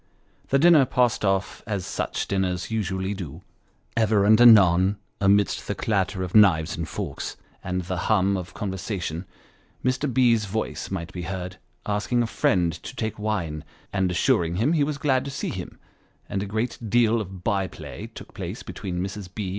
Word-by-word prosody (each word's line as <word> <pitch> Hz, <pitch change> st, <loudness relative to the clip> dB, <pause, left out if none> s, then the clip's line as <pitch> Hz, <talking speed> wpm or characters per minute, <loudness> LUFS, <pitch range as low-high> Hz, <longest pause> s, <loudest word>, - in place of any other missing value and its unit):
The 135 Hz, -, +4 dB
dinner 155 Hz, -2 st, +6 dB
passed 125 Hz, -3 st, +1 dB
off 95 Hz, -1 st, 0 dB
as 100 Hz, -4 st, -2 dB
such -, -, -3 dB
dinners 95 Hz, 0 st, -1 dB
usually 95 Hz, -2 st, -1 dB
do. 90 Hz, -3 st, -7 dB, 0.5 s
Ever 110 Hz, -3 st, +3 dB
and 110 Hz, +3 st, +6 dB
anon, 100 Hz, -4 st, +7 dB, 0.2 s
amidst 100 Hz, +1 st, +2 dB
the -, -, -2 dB
clatter 95 Hz, -3 st, 0 dB
of 90 Hz, -, -5 dB
knives 90 Hz, -7 st, +5 dB
and 80 Hz, -1 st, -4 dB
forks, 85 Hz, -10 st, -5 dB, 0.3 s
and 90 Hz, 0 st, -2 dB
the 90 Hz, +1 st, -3 dB
hum 100 Hz, -2 st, +3 dB
of 90 Hz, -2 st, -6 dB
conversa 100 Hz, 0 st, -3 dB
tion, 85 Hz, +2 st, -4 dB, 0.6 s
Mr. 130 Hz, +2 st, +1 dB
B.'s 115 Hz, -3 st, +3 dB
voice 110 Hz, +3 st, -3 dB
might 85 Hz, -3 st, -5 dB
be 90 Hz, -, -5 dB
heard, 90 Hz, -2 st, -5 dB, 0.3 s
asking 105 Hz, +4 st, 0 dB
a -, -, 0 dB
friend 90 Hz, -6 st, +1 dB
to -, -, -8 dB
take 110 Hz, -2 st, -3 dB
wine, 90 Hz, -8 st, -2 dB, 0.3 s
and 95 Hz, -2 st, +1 dB
assuring 85 Hz, -1 st, +2 dB
him 120 Hz, -, +2 dB
he 155 Hz, -3 st, +3 dB
was 145 Hz, 0 st, -2 dB
glad 135 Hz, -2 st, +1 dB
to -, -, -4 dB
see 140 Hz, -, -3 dB
him; -, -, -6 dB, 0.5 s
and 100 Hz, -1 st, -2 dB
a 100 Hz, -, -3 dB
great 110 Hz, +4 st, -2 dB
deal 115 Hz, 0 st, +3 dB
of 95 Hz, -3 st, -8 dB
by 95 Hz, -1 st, +1 dB
play 70 Hz, -8 st, -8 dB
took -, -, -12 dB
place -, -, -6 dB
between 90 Hz, -2 st, -5 dB
Mrs. 95 Hz, -1 st, -6 dB
B. 100 Hz, -1 st, -4 dB
100 Hz, 180 wpm, -25 LUFS, 90-110 Hz, 0.6 s, anon